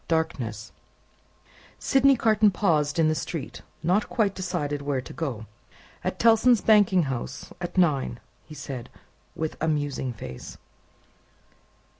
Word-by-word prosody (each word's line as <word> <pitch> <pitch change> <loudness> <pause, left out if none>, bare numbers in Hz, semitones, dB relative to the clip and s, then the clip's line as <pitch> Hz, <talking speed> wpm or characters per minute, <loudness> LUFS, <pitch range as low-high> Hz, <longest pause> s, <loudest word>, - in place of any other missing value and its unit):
Darkness 125 -10 -2 1.1
Sydney 270 0 +4
Carton 220 -3 +4
paused 155 -7 +1
in 165 -1 +4
the 155 - +2
street, 155 -1 -5 0.2
not 185 +6 +1
quite 210 -5 +1
decided 150 -7 -3
where 140 -2 -1
to 125 - -9
go. 130 -7 -4 0.6
"At - - -2
Tellson's 230 0 +5
banking 200 -5 +5
house 130 -2 -5
at 175 +1 -5
nine," 140 -9 +2 0.2
he 155 - -12
said, 135 -4 -7 0.5
with 160 -1 -3
a 160 - +1
musing 145 -4 -1
face. 65 - -9
160 Hz, 125 wpm, -26 LUFS, 135-195 Hz, 1.1 s, Tellson's